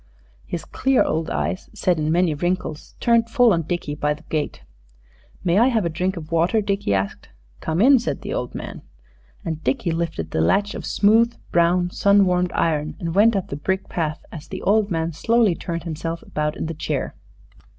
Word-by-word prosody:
His 170 - -4
clear 265 0 +2
old 160 0 -1
eyes 185 - -2
set 180 -3 +1
in 155 0 0
many 175 -1 +2
wrinkles 175 0 -3
turned 230 -1 +3
full 245 -3 +5
on 165 - +1
Dickie 165 -2 -3
by 150 0 0
the 155 - -17
gate. 155 -2 -2 0.8
"May 180 +2 +3
I 240 - +5
have 225 -7 +1
a - - +1
drink 180 +4 -2
of 155 -1 -8
water?" 170 +7 +2
Dickie 200 - -1
asked. 95 +1 -3 0.3
"Come 160 +1 -2
in," 265 +2 +7
said 235 - -4
the 205 - -4
old 125 - -3
man. - - -7 0.6
And 160 -1 -4
Dickie 230 -10 0
lifted 165 - -3
the 80 - 0
latch 200 - +2
of - - -6
smooth, 225 +3 +3 0.2
brown, 175 +1 +2
sun 200 +1 +4
warmed 180 -1 +1
iron, 155 -2 0
and 165 -4 -3
went 215 +4 +5
up 195 - -2
the - - -4
brick 190 +6 -2
path, 160 -2 -3
as 155 -2 -9
the 190 - -7
old 210 0 +3
man 165 -2 -1
slowly 225 +3 +3
turned 170 0 -5
himself 165 0 -4
about 150 0 -2
in - - -3
the 165 - -3
chair. 155 - -3
175 Hz, 195 wpm, -22 LUFS, 160-205 Hz, 0.8 s, in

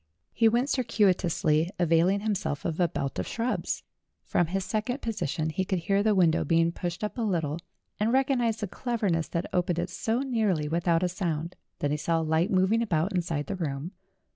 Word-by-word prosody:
He 225 -1 +4
went 240 +4 +1
circuitously, 185 - +2
availing 175 +3 +3
himself 200 -9 -2
of 165 -1 -2
a 175 - +4
belt 140 -3 -3
of - - -2
shrubs. 235 +2 -2 0.4
From 175 - +1
his 190 +2 -2
second 230 +6 -2
position 160 - -2
he 190 - -1
could 190 0 -1
hear 195 +4 +1
the 215 0 +3
window 170 -4 +3
being 165 0 +3
pushed 175 +2 -4
up 210 +4 -3
a - - 0
little, 165 -7 -1 0.4
and 215 +2 +2
recog 270 +1 +3
nized 225 -1 0
the 210 - -1
cleverness 200 -7 -1
that 170 +2 -2
opened 180 -1 +1
it 175 +1 -2
so 225 +5 -1
nearly 215 - 0
without 170 +2 +1
a - - +3
sound. 170 -2 -3 0.2
Then 145 - -1
he 150 - +1
saw 165 +2 0
a - - -1
light 160 +4 +1
moving 190 +4 +3
about 185 -3 0
inside 165 -5 -1
the - - -4
room. 155 -2 -3
180 Hz, 195 wpm, -28 LUFS, 165-215 Hz, 0.4 s, He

